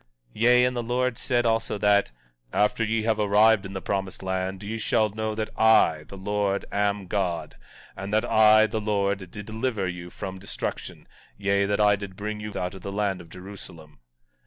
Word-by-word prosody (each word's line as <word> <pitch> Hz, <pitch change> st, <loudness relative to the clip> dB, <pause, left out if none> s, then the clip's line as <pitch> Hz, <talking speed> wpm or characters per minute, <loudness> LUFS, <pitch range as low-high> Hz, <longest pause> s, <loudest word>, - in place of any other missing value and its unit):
17:14 -, -, -36 dB
Yea, 125 Hz, +1 st, +6 dB
and 125 Hz, 0 st, 0 dB
the 120 Hz, -, -1 dB
Lord 125 Hz, +1 st, 0 dB
said 120 Hz, -2 st, +1 dB
also 115 Hz, -2 st, 0 dB
that: 100 Hz, -3 st, +3 dB, 0.4 s
After 105 Hz, +2 st, +1 dB
ye 110 Hz, 0 st, 0 dB
have 110 Hz, -1 st, +1 dB
arrived 105 Hz, 0 st, +4 dB
in 95 Hz, -, -10 dB
the 95 Hz, -, -5 dB
promised 95 Hz, -1 st, -3 dB
land, 95 Hz, +1 st, -3 dB
ye 110 Hz, +2 st, -4 dB
shall 110 Hz, 0 st, +2 dB
know 110 Hz, +1 st, -3 dB
that 110 Hz, 0 st, -3 dB
I, 80 Hz, -8 st, +4 dB
the 100 Hz, -, -10 dB
Lord, 100 Hz, 0 st, -1 dB
am 100 Hz, -1 st, 0 dB
God; 90 Hz, -3 st, -2 dB, 0.4 s
and 95 Hz, +1 st, -6 dB
that 110 Hz, +2 st, +2 dB
I, 110 Hz, -1 st, +6 dB
the 110 Hz, 0 st, -3 dB
Lord, 100 Hz, -3 st, -1 dB
did 105 Hz, +2 st, -8 dB
deliver 110 Hz, -3 st, -2 dB
you 90 Hz, 0 st, -6 dB
from 95 Hz, +1 st, -7 dB
destruction; 100 Hz, -, -6 dB, 0.3 s
yea, 100 Hz, 0 st, +1 dB
that 100 Hz, +1 st, 0 dB
I 105 Hz, -1 st, +5 dB
did 100 Hz, -1 st, -8 dB
bring 105 Hz, +1 st, -4 dB
you 105 Hz, 0 st, -6 dB
out 90 Hz, 0 st, -3 dB
of 95 Hz, -, -10 dB
the 100 Hz, -, -6 dB
land 100 Hz, -2 st, -1 dB
of 85 Hz, -, -15 dB
Jerusalem. 90 Hz, -6 st, -11 dB
105 Hz, 195 wpm, -25 LUFS, 95-110 Hz, 0.4 s, Yea